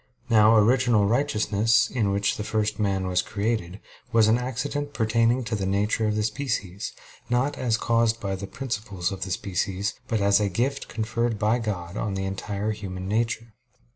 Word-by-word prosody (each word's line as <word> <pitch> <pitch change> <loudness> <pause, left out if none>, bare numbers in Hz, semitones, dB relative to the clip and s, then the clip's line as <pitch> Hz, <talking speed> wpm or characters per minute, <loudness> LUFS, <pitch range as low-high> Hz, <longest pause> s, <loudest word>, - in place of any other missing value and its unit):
Now 110 0 +6
original 115 -1 +4
righteousness, 110 -2 +2
in 115 -6 0
which 100 +1 +1
the 105 - -3
first 105 0 -1
man 100 -2 0
was 90 -1 +1
created, 100 -3 -2 0.3
was 115 -2 +5
an 115 +2 +4
accident 145 +3 -3
pertaining 115 +2 +2
to 115 -1 -2
the 100 -2 -2
nature 105 +3 +1
of 105 - 0
the 105 - 0
species, 105 -5 -3 0.4
not 125 +4 +1
as 115 -3 0
caused 115 0 +2
by 100 -2 -3
the 100 +1 -6
principles 100 -8 -3
of 95 -1 -6
the 95 - -3
species, 95 +2 -2
but 110 - 0
as 100 0 +4
a 105 -1 +1
gift 130 +9 -1
conferred 115 0 -1
by 110 +3 +2
God 95 -4 -4
on 105 -3 -2
the 95 0 -2
entire 100 +2 -3
human 95 -3 -6
nature. 115 +1 -1
110 Hz, 175 wpm, -25 LUFS, 100-115 Hz, 0.4 s, Now